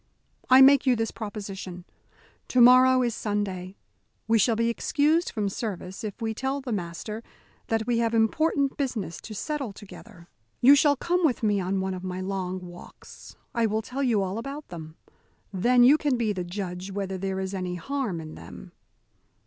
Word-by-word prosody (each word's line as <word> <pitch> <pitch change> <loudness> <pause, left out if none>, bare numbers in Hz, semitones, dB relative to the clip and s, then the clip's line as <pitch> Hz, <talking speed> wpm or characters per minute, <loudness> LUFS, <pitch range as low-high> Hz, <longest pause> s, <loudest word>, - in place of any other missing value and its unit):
I 260 +1 +8
make 275 0 +6
you 250 - +5
this 225 -1 -2
proposition. 195 -4 -7 0.6
To 255 - +1
morrow 255 +1 +7
is 240 -2 0
Sunday. 200 -3 -3 0.5
We 225 0 +3
shall 230 +2 +3
be 230 +1 +1
excused 300 +7 +1
from 210 -2 -2
service 195 -2 -5
if 210 0 -6
we 225 -1 -2
tell 265 +5 -2
the 260 -3 -6
master 205 +3 -4 0.5
that 225 -1 0
we 240 -1 +1
have 230 0 +1
important 275 +5 +1
business 220 - -3
to 215 - -9
settle 285 -1 -3
together. 190 -4 -13 0.3
You 265 +4 +8
shall 285 0 +4
come 350 +6 0
with 265 -7 +1
me 205 -2 +2
on 190 +1 -1
one 190 0 -2
of 185 0 -7
my 185 0 -4
long 185 -1 -4
walks. 175 0 -13 0.2
I 230 -2 +2
will 220 +1 -1
tell 265 +5 -5
you 230 -7 +2
all 190 +3 -3
about 280 +5 -7
them. 160 -2 -9 0.6
Then 245 +6 +4
you 285 +5 +6
can 285 -4 +1
be 225 -3 0
the 185 -2 -3
judge 180 0 -5
whether 195 -1 -4
there 190 0 -2
is 190 0 -4
any 185 -2 -3
harm 230 -1 -3
in 155 -1 -8
them." 60 - -11
215 Hz, 180 wpm, -26 LUFS, 190-255 Hz, 0.6 s, I